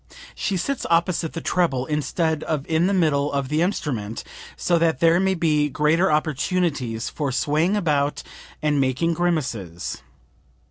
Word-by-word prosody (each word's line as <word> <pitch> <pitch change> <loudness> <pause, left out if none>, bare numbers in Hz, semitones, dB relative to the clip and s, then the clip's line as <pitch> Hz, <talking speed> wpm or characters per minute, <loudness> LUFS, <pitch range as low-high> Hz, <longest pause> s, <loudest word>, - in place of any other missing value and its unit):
She 195 - -2
sits 275 +9 -2
opposite 170 -1 +1
the 165 - -4
treble 140 -8 0
instead 155 +1 -1
of 150 -3 -2
in 165 +2 +2
the - - +1
middle 150 -6 +2
of 140 -2 -2
the 155 +2 +1
instrument, 125 - -2 0.3
so 175 -1 +2
that 165 -5 +2
there 165 +1 +4
may 190 0 +2
be 150 -3 +2
greater 155 +5 +2
opportunities 150 -6 0
for 145 -3 -3
swaying 155 +9 +1
about 150 -6 0 0.4
and 150 -2 +2
making 135 +6 +1
grimaces. 125 - -2
155 Hz, 145 wpm, -23 LUFS, 140-170 Hz, 0.4 s, there